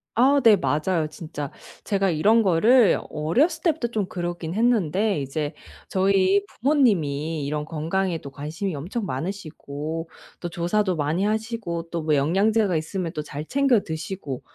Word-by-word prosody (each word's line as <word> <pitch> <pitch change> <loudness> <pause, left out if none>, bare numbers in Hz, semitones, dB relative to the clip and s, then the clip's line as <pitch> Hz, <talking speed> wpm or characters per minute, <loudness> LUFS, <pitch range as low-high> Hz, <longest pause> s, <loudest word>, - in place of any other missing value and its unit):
아 275 +4 +4
네 220 -3 +7
맞아요 160 0 0
진짜. 150 -3 -7 0.3
제가 195 -2 +1
이런 205 +8 +4
거를 215 +6 +5
어렸을 270 - +1
때부터 320 -8 +1
좀 215 -4 -2
그러긴 175 -2 -4
했는데 210 -5 +2
이제 145 +3 -3 0.3
저희 195 +1 +3
부모님이 165 - +1
이런 150 +1 -2
건강에도 165 +1 -2
관심이 155 +7 -4
엄청 185 +10 -4
많으시고 160 -1 -5 0.3
또 175 - -3
조사도 180 +3 0
많이 155 +5 0
하시고 215 -6 -2
또 170 -1 -3
뭐 155 -1 +2
영양제가 195 +7 +2
있으면 165 +2 -3
또 155 - -3
잘 150 0 -7
챙겨 270 -1 +3
드시고. 160 -4 -5
175 Hz, 305 characters per minute, -24 LUFS, 155-215 Hz, 0.3 s, 네